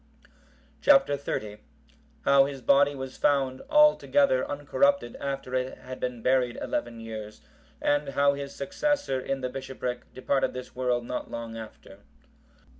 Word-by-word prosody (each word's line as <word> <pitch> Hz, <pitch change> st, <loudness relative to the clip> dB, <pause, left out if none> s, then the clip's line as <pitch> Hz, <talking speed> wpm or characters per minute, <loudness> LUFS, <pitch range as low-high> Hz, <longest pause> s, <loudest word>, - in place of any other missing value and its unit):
Chap. 275 Hz, -1 st, +6 dB
XXX. 110 Hz, -7 st, -3 dB, 0.7 s
How 140 Hz, 0 st, +6 dB
his 135 Hz, -2 st, -6 dB
body 185 Hz, -6 st, +4 dB
was 130 Hz, -1 st, -7 dB
found 135 Hz, -3 st, +1 dB
altogether 300 Hz, -, +4 dB
uncorrupted 280 Hz, -, +1 dB
after 135 Hz, -2 st, -4 dB
it 130 Hz, 0 st, -1 dB
had 130 Hz, 0 st, -9 dB
been 125 Hz, -2 st, -4 dB
buried 125 Hz, -2 st, +2 dB
eleven 120 Hz, -1 st, -3 dB
years; 110 Hz, -1 st, -8 dB, 0.4 s
and 145 Hz, 0 st, +1 dB
how 140 Hz, +1 st, +3 dB
his 140 Hz, 0 st, -6 dB
successor 285 Hz, -, -1 dB
in 135 Hz, +1 st, -3 dB
the 130 Hz, -, -2 dB
bishopric 125 Hz, -2 st, -5 dB
departed 135 Hz, +1 st, 0 dB
this 125 Hz, 0 st, -8 dB
world 125 Hz, -1 st, 0 dB
not 125 Hz, -, -4 dB
long 115 Hz, -1 st, -6 dB
after. 110 Hz, -3 st, -11 dB
130 Hz, 135 wpm, -27 LUFS, 125-145 Hz, 0.7 s, Chap